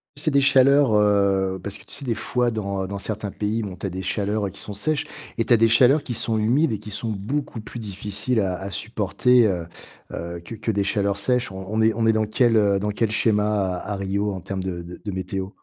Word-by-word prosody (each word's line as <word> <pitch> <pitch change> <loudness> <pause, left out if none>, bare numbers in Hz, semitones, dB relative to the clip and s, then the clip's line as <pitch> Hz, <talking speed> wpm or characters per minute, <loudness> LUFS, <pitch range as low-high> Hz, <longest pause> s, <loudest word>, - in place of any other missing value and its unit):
C'est 145 +2 0
des 140 -2 +3
chaleurs, 135 -1 +5
heu, 100 -2 +2
parce 100 0 -4
que - - -17
tu - - -16
sais, 140 0 -4
des 120 - 0
fois 120 +2 0
dans 100 -3 -2
dans 100 +1 -5
certains 105 0 -4
pays, 110 +3 -2
bon 95 -3 -6
tu 90 +2 -4
as - - -3
des 95 +1 -5
chaleurs 100 +1 -1
qui - - -9
sont 105 - -4
sèches 150 +9 0 0.3
et - - +4
tu - - -5
as - - +6
des 115 +1 +5
chaleurs 130 +6 +5
qui 125 - -4
sont 115 0 -1
humides 125 +9 +2
et 110 - -1
qui 105 - -10
sont 105 +3 -3
beaucoup 115 +6 -3
plus 120 - -8
difficiles 105 +3 -2
à 95 -2 -1
à 95 +1 -5
supporter, 110 +4 +2
heu, 90 -4 -1 0.5
heu, 85 +1 -5
que 85 - -9
que 110 0 -4
des 100 -2 +1
chaleurs 100 0 0
sèches. 125 +2 0
On 95 0 -7
on 110 +2 0
est 110 0 +4
on 115 0 0
est 110 - +5
dans 110 0 +1
quel, 115 +1 +3
heu, 100 -2 +3
dans 105 +1 -1
quel 110 +1 0
schéma 105 -3 +1
à 90 - -6
à - - -2
Rio 100 +1 -1
en 95 - -5
termes 95 +1 -5
de 90 -2 -4
de 85 +1 -10
de 105 - -3
météo? 95 0 -4
105 Hz, 255 wpm, -23 LUFS, 95-115 Hz, 0.5 s, as